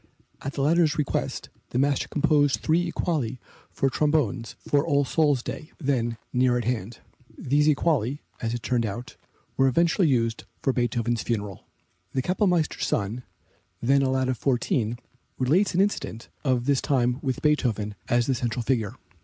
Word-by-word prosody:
At 135 - -4
the 140 - -1
latter's 165 +1 +3
request 150 - -2 0.2
the - - -3
master 140 +1 +1
composed 145 -5 +2
three 170 +2 +1
equali 140 -10 -1 0.3
for 135 - 0
trombones 135 -5 0
for 145 -1 +3
All 145 -3 +2
Souls' 145 -3 +2
Day, 135 +5 -7
then 120 -6 0 0.2
near 125 -1 +3
at 120 - -1
hand. 115 -2 -2 0.4
These 145 +3 +2
equali, 145 -4 +2 0.2
as 115 0 -1
it 120 - -6
turned 120 +1 +1
out, 115 +3 -5 0.4
were 135 - +4
eventually 170 - +3
used 115 -4 0 0.2
for 135 - +2
Beethoven's 120 -1 0
funeral. 105 -5 -4 0.5
The 130 -2 0
Kapellmeister's 180 - +1
son, 110 +4 -1 0.6
then 135 +3 +3
a 135 - +2
lad 130 0 +1
of 130 -3 -1
fourteen, 120 -3 0 0.4
relates 170 +10 +2
an 185 - +4
incident 195 - -2
of 130 -4 +1
this 140 -1 +2
time 125 -3 +1
with 130 -3 -2
Beethoven 115 -9 +1 0.2
as 120 0 +3
the 135 - +1
central 120 0 -2
figure. 115 -2 0
130 Hz, 160 wpm, -26 LUFS, 120-150 Hz, 0.6 s, were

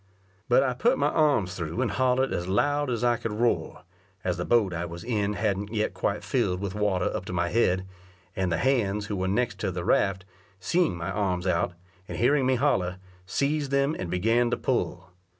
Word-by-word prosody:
But 125 +2 +5
I 130 -2 0
put 240 - +2
my - - +2
arms 140 - +2
through 85 +2 -4
and 130 -2 +1
hollered 130 +1 +1
as 85 - -2
loud 145 +9 +1
as 120 -1 -1
I 120 -1 +3
could 115 - -4
roar, 115 +2 0 0.4
as 90 -2 -1
the 90 - -3
boat 110 -6 +3
I 85 0 -2
was 85 0 -7
in 105 -4 0
hadn't 105 -1 -1
yet 110 -1 -1
quite - - -2
filled 90 0 0
with 100 -1 -4
water 105 -3 0
up - - -3
to 90 - -6
my 90 0 0
head, 95 -4 +2 0.5
and 95 -2 -1
the 85 - +1
hands 105 -3 +1
who 105 - -3
were 95 -1 -1
next 100 0 0
to 100 - -1
the 90 -1 -4
raft, 95 -1 +2 0.3
seeing 160 - +1
my 85 +3 -4
arms 95 -3 -1
out, 90 -1 +1 0.3
and - - -6
hearing 130 +2 +3
me 130 - +3
holler, 95 -9 +1 0.3
seized 140 +7 0
them, 140 +3 +1
and 90 - -4
began 115 +7 +2
to - - 0
pull. 90 0 -2
105 Hz, 205 wpm, -27 LUFS, 90-125 Hz, 0.5 s, But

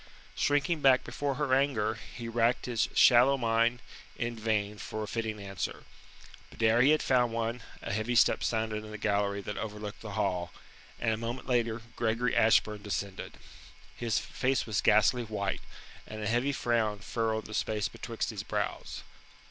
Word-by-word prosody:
Shrinking 145 +3 +1
back 130 -2 +5
before 140 +3 -3
her 140 -2 0
anger, 130 -6 +2 0.2
he 120 -1 -6
racked 115 +1 +1
his 120 -3 0
shallow 130 +2 +6
mind 115 0 +1 0.3
in 120 0 -2
vain 105 -2 -1
for 110 0 -5
a - - -5
fitting 110 -2 -3
answer. 100 -1 -5 0.7
But - - -6
ere 110 +2 +5
he 130 - +6
had 155 0 +4
found 125 -3 +2
one, 115 +1 -2 0.2
a - - -3
heavy 110 +4 -1
step - - +4
sounded 110 -1 -1
in 110 - -9
the 110 - -6
gallery 100 -1 0
that 105 +1 -5
overlooked 105 -1 -6
the 105 -2 -7
hall, 90 -5 -1 0.5
and 115 -2 +1
a - - -2
moment 115 +3 -5
later 120 -3 0
Gregory 115 +2 0
Ashburn 110 -1 +3
descended. 100 -2 -4 0.6
His 115 -2 -1
face 130 0 0
was 110 -2 0
ghastly 110 +4 +4
white, 105 -4 -3 0.5
and 110 - -7
a - - -1
heavy 120 +5 +1
frown 115 -5 0
furrowed 110 +2 -2
the 110 - -9
space 105 -1 0
betwixt - - -4
his - - -5
brows. - - -4
115 Hz, 170 wpm, -30 LUFS, 105-120 Hz, 0.7 s, shallow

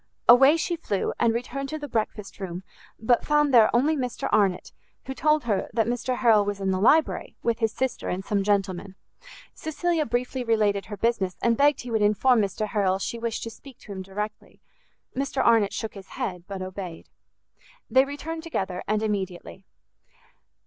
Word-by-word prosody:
Away 270 +6 +7
she 345 +1 -1
flew, 205 - -2
and 235 -1 +3
returned 255 +4 -4
to 310 - -3
the 290 -1 -6
breakfast 215 -4 -3
room, 185 -1 -5 0.4
but 235 +2 +2
found 295 -2 +2
there 230 -3 +7
only 285 +7 +2
Mr 250 -4 -3
Arnott, 195 -4 +1 0.3
who 265 - -4
told 305 +2 +2
her 215 -5 -1
that 225 -1 +2
Mr 245 +1 -2
Harrel 225 -4 +5
was 205 0 -3
in 195 -1 0
the 185 - 0
library, 310 +9 +2
with 235 -1 0
his 225 -2 +1
sister 260 +1 -3
and 190 +1 -3
some 205 -1 0
gentlemen. 195 -1 -1 0.6
Cecilia 315 0 -1
briefly 250 +1 -2
related 210 -4 +1
her 205 - -7
business, 195 -6 0
and 235 -1 +3
begged 285 +3 +3
he 240 - -8
would 220 -1 +1
inform 215 +4 +4
Mr 200 +2 -2
Harrel 195 -3 +1
she 230 +4 -4
wished 230 -1 -3
to 230 - -5
speak 255 +3 -14
to 210 - -11
him 190 -1 -5
directly. 210 +3 -6 0.6
Mr 275 0 -1
Arnott 225 -4 +4
shook 220 - -4
his 195 -2 -11
head, 185 -9 -4
but 195 -2 -5
obeyed. 185 -3 -7 0.8
They 260 - +5
returned 310 +3 -6
together, 190 - -3
and 215 +1 0
immediately. 190 -2 -4
225 Hz, 180 wpm, -25 LUFS, 200-260 Hz, 0.8 s, Away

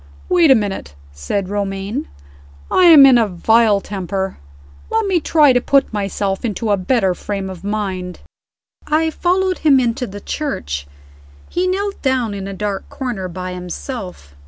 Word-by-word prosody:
"Wait 350 -4 +4
a 265 - +8
minute," 195 - -3 0.2
said 70 - -3
Romayne. 195 - -3 0.6
"I 370 - +4
am 315 -5 +9
in 260 -3 +6
a 225 - +2
vile 210 +3 +3
temper. 195 -1 -4 0.5
Let 445 -1 0
me 380 -3 +2
try 300 -3 +4
to 245 - +2
put 275 -2 +2
myself 195 -1 -2
into 220 -1 -2
a - - +4
better 190 0 +1
frame 195 +1 -5
of 180 -1 -10
mind." 195 -3 -3 0.7
I 320 +1 +1
followed 370 +3 0
him 285 -4 +4
into 250 +1 -1
the 205 +1 -8
church. 75 - -4 0.6
He 360 +1 -1
knelt 395 +2 -2
down 255 -5 0
in 195 -1 -5
a - - -5
dark 200 0 -4
corner 240 -8 -4
by 185 +1 -6
himself. 180 - -7
210 Hz, 160 wpm, -18 LUFS, 190-275 Hz, 0.7 s, am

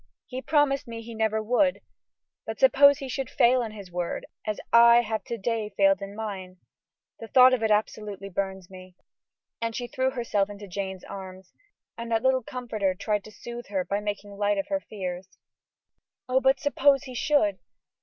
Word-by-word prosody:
He 255 0 -6
promised 290 -2 +1
me 230 -1 -7
he 230 +1 -9
never 220 0 0
would; 260 +5 +2 0.7
but - - -5
suppose 285 - +6
he 275 - -6
should 265 -1 -4
fail 250 +1 +4
in 225 -2 -4
his 200 -4 -11
word, 175 -1 -3 0.2
as 215 - -2
I 235 0 +8
have 220 -1 -3
to 235 - -4
day 220 0 -2
failed 195 -1 +4
in 200 +1 -7
mine? 195 -4 -6 0.6
The 225 - -8
thought 255 +3 +7
of 250 - +1
it 220 - +1
absolutely 210 -2 -1
burns 190 -1 -4
me." 185 -1 -13 0.7
And 230 -1 -2
she 245 - -3
threw 260 +1 -1
herself 230 -6 -1
into 205 0 -9
Jane's 190 0 -5
arms, 190 -1 -10 0.5
and 235 0 -6
that 225 -1 +1
little 260 0 +3
comforter 220 -6 -2
tried 210 +1 -1
to 215 - -11
soothe 240 +2 -9
her 190 -3 -2
by 200 +3 -1
making 205 -1 -5
light 205 0 +1
of 195 - -3
her 290 -1 0
fears. 185 -5 -7 0.9
"Oh! 255 +1 +2
but 265 +1 +3
suppose 285 -1 +3
he 260 -3 -9
should?" 240 -8 +1
220 Hz, 185 wpm, -26 LUFS, 195-250 Hz, 0.9 s, I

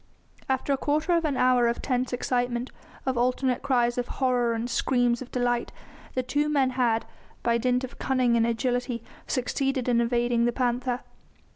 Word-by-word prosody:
After 265 +1 +1
a - - +1
quarter 305 +5 +1
of 335 -1 +1
an 285 -4 0
hour 250 -1 +4
of 235 - -1
tense 255 -1 -1
excitement, 245 0 -1 0.3
of 260 -2 0
alternate 250 +1 +1
cries 245 -3 +1
of 245 - -2
horror 250 -3 +2
and 225 +1 -2
screams 245 -1 +1
of 255 - -7
delight, 245 -1 0 0.4
the 255 - 0
two 295 +4 0
men 275 -3 +2
had, 240 -3 +1 0.4
by 235 0 +2
dint 250 +1 +1
of 260 - -8
cunning 255 -3 +2
and 230 0 +3
agility, 245 0 -1 0.2
succeeded 265 0 -1
in 235 -1 +3
evading 235 0 +1
the 240 - +2
panther. 250 0 -1
250 Hz, 170 wpm, -26 LUFS, 240-260 Hz, 0.4 s, hour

